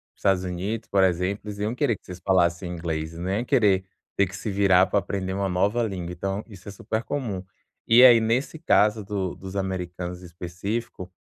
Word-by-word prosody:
os - - -33
Estados 95 -2 +2
Unidos, 95 +5 -4
por 95 -1 +3
exemplo, 90 +2 +1
eles 100 -1 -6
iam 110 +3 -1
querer 125 -5 +1
que - - -34
vocês 90 -1 -9
falassem 90 -1 +1
inglês, 80 -2 -4
não 90 +2 -4
iam 110 +6 -1
querer 105 -9 +3 0.3
ter 100 - +4
que 95 - -9
se 100 - -5
virar 95 -2 +4
pra 100 - +2
aprender 95 -1 -3
uma 100 0 -1
nova 100 +6 +1
língua. 90 -5 -4
Então 95 +4 -3
isso 100 -4 -14
é - - -6
super 110 +3 -3
comum. 110 -10 -3 0.4
E 120 +3 +7
aí, 120 -2 +9
nesse 115 +8 0
caso 105 -9 +3
do 95 -3 -3
dos 95 0 -9
americanos 90 -2 -4
específico 90 +4 -5
95 Hz, 200 wpm, -25 LUFS, 90-105 Hz, 0.4 s, aí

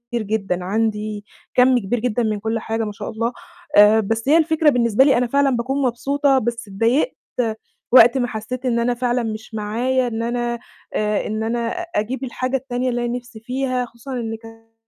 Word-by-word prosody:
جدًا، 200 -5 -1
عندي 210 +1 -2 0.3
كَم 255 0 +5
كبير 230 +3 -2
جدًا 240 0 0
من 215 -2 -1
كلّ 225 +2 -2
حاجة 225 +1 -2
ما 210 - -4
شاء 205 - -7
الله. 230 +2 -2 0.4
آآ 210 +2 +7
بس 225 +4 -1
هي 310 - +6
الفكرة 320 -1 +3
بالنسبة 235 -2 +3
لي 275 -2 +4
أنا 245 0 +1
فعلًا 280 +3 +3
باكون 265 +4 -1
مبسوطة، 275 +2 +2
بس 235 -1 -3
اتضايقت 230 - +1 0.8
وقت 245 0 +7
ما 245 -2 +1
حسّيت 245 +3 -5
إن 235 -2 +1
أنا 240 +1 +1
فعلًا 245 0 0
مش 220 0 -6
معايا 240 +5 0
إن 230 -1 -3
أنا 240 0 -2 0.3
آآ، 210 -1 0
إن 215 +1 -2
أنا 230 +1 -1
أجيب 265 -8 -3
الحاجة 255 +1 -1
التانية 255 -1 -2
اللي 240 0 -1
أنا 240 +1 -1
نِفْسي 240 -2 -11
فيها، 255 +1 -2
خصوصًا 235 +3 -10
إن 225 -2 -3
كان 225 0 -15
235 Hz, 185 wpm, -21 LUFS, 220-255 Hz, 0.8 s, آآ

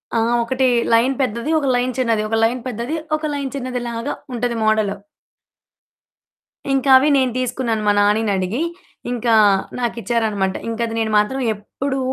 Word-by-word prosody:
ఆ! - - +3 0.2
ఒకటి 260 +2 +1 0.3
లైన్ 245 +4 +4
పెద్దది, 235 +4 -1
ఒక 280 - -2
లైన్ 250 +1 0
చిన్నది. 230 -4 +1
ఒక 225 - +1
లైన్ 240 +2 +1
పెద్దది, 240 +6 -3 0.2
ఒక 310 - -6
లైన్ 280 -2 -3
చిన్నదిలాగా 250 -1 -3 0.2
ఉంటది 240 0 -1
మోడల్. 215 -2 +2 1.8
ఇంకవి 270 +1 +5
నేను 260 -2 +2
తీసుకున్నాను 240 -3 -1
మా 205 - +5
నానీనడిగి. 205 +1 +1 0.5
ఇంకా 235 -1 0 0.5
నాకిచ్చారనమాట. 225 -5 -1
ఇంకది 230 0 -2
నేను 220 -1 -1
మాత్రం 260 +6 +1
ఎప్పుడూ 265 +6 -4
235 Hz, 130 wpm, -20 LUFS, 220-260 Hz, 1.8 s, ఇంకవి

